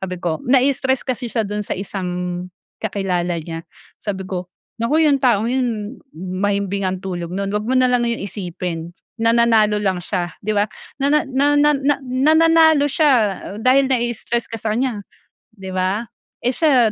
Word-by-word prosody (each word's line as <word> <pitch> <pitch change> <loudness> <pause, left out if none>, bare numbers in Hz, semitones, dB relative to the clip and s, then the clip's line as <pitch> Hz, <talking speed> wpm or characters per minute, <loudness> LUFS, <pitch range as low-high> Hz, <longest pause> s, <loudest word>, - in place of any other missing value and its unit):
sabi 185 -1 -4
ko, 160 -3 -1
nai-stress 265 0 +2
kasi 250 -1 -2
siya 225 -1 -1
do'n 210 +1 -3
sa - - -3
isang 190 -1 -4 0.7
kakilala 180 -4 -1
niya. 165 +1 -6 0.4
Sabi 195 -2 -4
ko, 180 -3 -4 0.3
"Naku 305 +8 +3
yung 280 -2 +3
taong 230 -3 +3
yun, 240 -3 -2 0.2
mahimbing 200 +2 -1
ang 185 - -2
tulog 175 -3 -4
no'n. 195 +2 -2
'Wag 210 +1 -2
mo 260 - +2
na 255 0 +5
lang 240 -1 +2
yun 235 - -2
isipin, 175 -4 -5 0.3
nananalo 230 -2 +4
lang 185 -2 0
siya." 175 -3 -2
Di 215 - -1
ba? 205 - +4 0.4
Nana 285 +2 +3
na 275 +2 +2
na 295 0 +5
na 280 +1 +1
"nananalo 315 +3 +4
siya 290 0 +3 0.5
dahil 265 +2 +5
nai-stress 240 -1 -1
ka 225 - -3
sa 215 0 -2
kaniya," 245 -3 -1 0.6
di 190 -1 -8
ba? 190 +5 0 0.4
"Eh, 250 - +1
siya, 260 -9 +4
220 Hz, 165 wpm, -20 LUFS, 190-260 Hz, 0.7 s, na